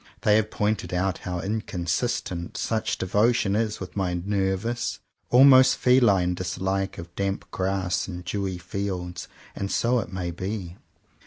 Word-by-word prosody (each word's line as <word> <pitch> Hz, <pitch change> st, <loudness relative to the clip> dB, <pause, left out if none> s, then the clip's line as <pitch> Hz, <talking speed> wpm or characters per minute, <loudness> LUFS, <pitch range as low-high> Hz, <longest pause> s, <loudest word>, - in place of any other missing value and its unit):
They 105 Hz, 0 st, +4 dB
have 110 Hz, -1 st, +1 dB
pointed 105 Hz, -3 st, -1 dB
out 95 Hz, +1 st, 0 dB
how 90 Hz, -1 st, -2 dB
inconsistent 95 Hz, -1 st, -2 dB
such 110 Hz, 0 st, -1 dB
devotion 105 Hz, +1 st, +2 dB
is 110 Hz, -1 st, -1 dB
with 95 Hz, -, -8 dB
my 95 Hz, -3 st, 0 dB
nervous, 100 Hz, +5 st, -1 dB, 0.3 s
almost 130 Hz, 0 st, +7 dB
feline 105 Hz, -9 st, +4 dB
dislike 95 Hz, +2 st, -2 dB
of 85 Hz, 0 st, -9 dB
damp 100 Hz, 0 st, -2 dB
grass 95 Hz, -1 st, -1 dB
and 90 Hz, -2 st, -7 dB
dewy 95 Hz, 0 st, -2 dB
fields; 90 Hz, 0 st, -4 dB, 0.3 s
and 100 Hz, 0 st, -3 dB
so 120 Hz, +1 st, +2 dB
it 90 Hz, -, -5 dB
may 90 Hz, -2 st, -3 dB
be. 95 Hz, 0 st, -5 dB
95 Hz, 140 wpm, -25 LUFS, 90-110 Hz, 0.3 s, almost